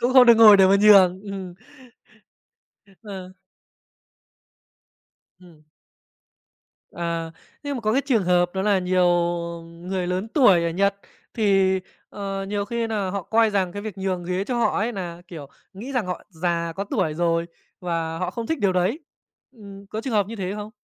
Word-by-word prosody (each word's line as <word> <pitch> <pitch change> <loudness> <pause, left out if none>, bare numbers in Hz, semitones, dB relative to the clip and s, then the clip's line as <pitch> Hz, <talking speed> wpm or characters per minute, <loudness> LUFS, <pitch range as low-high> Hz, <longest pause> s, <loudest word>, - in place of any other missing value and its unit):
cũng 245 +2 +1
không 255 -1 +7
được 235 - +8
ngồi 215 -2 +9
để 190 -1 +6
mà 195 +1 +5
nhường, 190 -3 +6
ừm. 195 -3 -7 1.5
Ờ. 190 -4 -9 2.1
Ừm. 165 -4 -19 1.3
À. 170 -1 -4 0.3
Nhưng 285 -1 -4
mà - - -5
có 215 -1 0
cái 265 - +2
trường 235 -9 +1
hợp 175 0 +1
đó 190 - -1
là 205 -1 +2
nhiều 185 0 +1 0.6
người 175 +2 -5
lớn 185 +4 -3
tuổi 210 - +4
ở 170 - 0
Nhật 200 +4 +1 0.4
thì, 195 -4 +2 0.3
ờ, 195 -1 -5
nhiều 205 0 -2
khi 230 +2 -3
nà 205 -4 -2
họ 200 -1 -4
coi 225 +4 +2
rằng 190 -3 -1
cái 205 - -6
việc 210 -3 -7
nhường 185 -2 -3
ghế 180 +2 -2
cho 245 +2 -2
họ 235 - +1
ấy 225 +3 -1
nà, 175 -4 -7
kiểu, 160 -6 -9 0.3
nghĩ 230 +8 -8
rằng 245 -7 -1
họ 180 - -5
già, 170 -1 -2
có 200 - -3
tuổi 155 -6 -1
rồi 170 0 0 0.3
và 165 -2 -3
họ 180 0 -2
không 230 +4 -6
thích 320 - -2
điều 195 -2 +2
đấy, 185 - 0 0.5
ừm, 200 -4 -13
có 215 +2 -5
trường 250 0 -5
hợp 205 -2 +2
như 230 +2 -8
thế 190 -1 -4
không? 210 0 -7
195 Hz, 180 wpm, -23 LUFS, 180-215 Hz, 2.1 s, ngồi